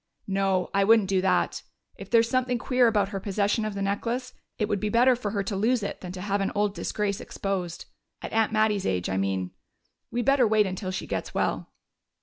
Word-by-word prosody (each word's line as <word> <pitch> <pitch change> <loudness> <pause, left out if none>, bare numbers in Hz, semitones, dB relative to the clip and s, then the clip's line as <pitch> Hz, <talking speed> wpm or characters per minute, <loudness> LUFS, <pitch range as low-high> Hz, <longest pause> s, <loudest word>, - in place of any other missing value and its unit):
"No, 195 -2 0
I 200 0 +3
wouldn't 215 -2 +4
do 190 -1 +2
that. 190 0 +1 0.3
If - - -10
there 230 -1 +6
is 230 - -1
something 250 0 +1
queer 250 0 +3
about 205 -3 +2
her 200 -2 -4
possession 205 +2 0
of 215 -2 -4
the 200 - -2
necklace, 235 +6 -2 0.2
it 210 - 0
would 205 -2 -1
be 210 - -1
better 245 +4 +4
for 235 -4 -4
her 200 -1 -1
to 195 +1 -3
lose 225 +3 +1
it 200 - -5
than 180 - -6
to 185 - -7
have 200 +1 -1
an 195 - 0
old 205 -1 +1
disgrace 205 -1 -2
exposed. 185 -4 -4 0.3
At - - -7
Aunt 225 -1 +2
Mattie's 215 -2 +1
age, 90 -1 -1
I 95 - 0
mean. 95 -2 -1 0.6
We 240 0 -1
better 275 -2 +4
wait 215 -1 +3
until 185 0 -4
she 185 - -4
gets - - -4
well." - - -1
205 Hz, 220 wpm, -26 LUFS, 195-225 Hz, 0.6 s, there